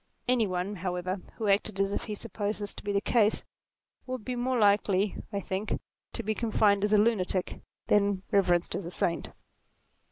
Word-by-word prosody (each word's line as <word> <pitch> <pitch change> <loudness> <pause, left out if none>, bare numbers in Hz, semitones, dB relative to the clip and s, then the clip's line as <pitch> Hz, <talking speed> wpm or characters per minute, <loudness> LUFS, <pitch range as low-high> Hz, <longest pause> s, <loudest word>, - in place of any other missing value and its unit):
Any 245 -3 +3
one, 185 +2 -2
however, 180 +1 -3 0.2
who 220 - -3
acted 200 0 +1
as 195 0 +1
if - - -2
he 215 - -4
supposed 210 -1 -3
this 205 -1 -3
to - - -10
be 205 - -2
the 200 0 +1
case, 220 -2 +2 0.6
would 255 -4 -5
be 250 - -2
more 250 +1 0
likely, 200 -2 +3 0.2
I 200 - -1
think, 195 +2 -3 0.3
to - - -3
be 220 - 0
confined 210 -3 +2
as 210 - +1
a 210 - +6
lunatic, 200 -4 +1 0.2
than 200 -2 +2
reverenced 180 -3 +3
as - - -3
a - - -4
saint. 170 -1 -1
205 Hz, 185 wpm, -29 LUFS, 190-215 Hz, 0.6 s, a